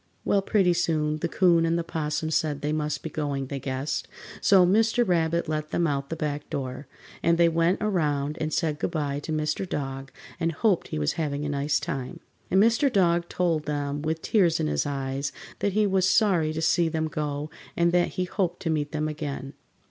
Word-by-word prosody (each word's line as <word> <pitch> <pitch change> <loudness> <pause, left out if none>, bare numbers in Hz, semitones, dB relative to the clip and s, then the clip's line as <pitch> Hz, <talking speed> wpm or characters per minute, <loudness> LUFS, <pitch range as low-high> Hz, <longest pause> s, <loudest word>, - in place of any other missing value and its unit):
Well, 200 - +3
pretty 195 -3 +3
soon 155 -3 0
the 170 - -1
'Coon 170 -1 +3
and 165 +1 +1
the 170 - -1
'Possum 160 -1 -2
said 150 -2 0
they 150 +1 -1
must 150 -2 -2
be 160 - -4
going, 140 -3 -2
they 135 +1 -5
guessed, 135 +2 -3 0.3
so 190 -2 +6
Mr. 225 +5 +3
Rabbit 170 -1 +1
let 155 0 -2
them 175 - +1
out 140 -3 -1
the 165 - -3
back 150 -2 -3
door, 130 0 -4 0.3
and 170 0 +3
they 170 0 +5
went 165 +4 +1
around 150 -8 0
and 155 0 -1
said 155 -4 0
goodby 145 -5 -1
to 160 - -6
Mr. 155 +4 -1
Dog 135 -1 -4 0.3
and 165 0 0
hoped 195 +1 +1
he - - -4
was 75 -1 0
having 145 -1 -2
a - - -2
nice 140 0 0
time. 130 -1 -5 0.3
And 190 - +4
Mr. 235 +6 +4
Dog 175 -4 +2
told 165 -4 0
them, 145 -1 -2
with 160 +1 -2
tears 180 -7 +3
in - - 0
his 75 - 0
eyes, 135 0 -2 0.3
that 200 - 0
he 215 +1 +3
was 190 -2 +2
sorry 185 -6 +3
to 160 +1 -3
see 170 0 +3
them 160 0 -1
go 150 -1 -3 0.3
and 170 0 +3
that 175 0 +3
he 185 - +1
hoped 180 -1 -2
to 165 - 0
meet 150 -1 -1
them 155 0 -1
again. 145 -3 -5
155 Hz, 205 wpm, -26 LUFS, 145-175 Hz, 0.3 s, so